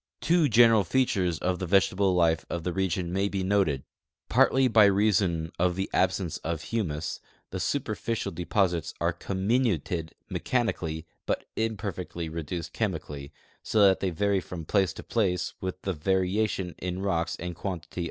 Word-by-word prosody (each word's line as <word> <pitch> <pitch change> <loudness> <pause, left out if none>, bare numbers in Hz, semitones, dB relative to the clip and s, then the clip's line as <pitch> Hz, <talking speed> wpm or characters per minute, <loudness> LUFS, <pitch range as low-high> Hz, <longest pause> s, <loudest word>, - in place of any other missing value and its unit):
Two 165 -2 +3
general 115 -2 +6
features 95 -7 +1
of 90 +1 -1
the 95 - -3
vegetal 95 0 +3
life 85 -2 +3
of 85 -1 -3
the 90 0 -2
region 90 -2 -1
may 100 +1 +1
l)e 95 -1 -2
noted: 95 -9 +1 0.5
Partly 130 0 +4
by 110 -3 +6
reason 95 -5 +2
of 90 0 +2
the 95 +1 -3
absence 95 -3 +1
of 80 -1 -3
humus, 80 -9 -2 0.3
the - - -3
superficial 115 -1 -2
deposits 90 0 0
are - - +1
comminuted 95 - -1
mechanically 85 -10 -1 0.2
but - - -1
imperfectly 100 -6 -3
reduced 85 +1 -5
chemically, 70 -1 -3 0.3
so 110 -2 +2
that 95 -1 +5
the}^ 95 - -1
vaiy 100 +3 +1
from 85 -3 -7
place 95 0 +2
to - - -9
place 90 -6 0
with 95 0 -4
the 95 - -1
varia 95 +5 +1
tion 90 -4 -4
in 90 +1 -3
rocks 85 -3 0
and 90 +1 -5
quantity 90 -1 -5
95 Hz, 155 wpm, -27 LUFS, 85-100 Hz, 0.5 s, general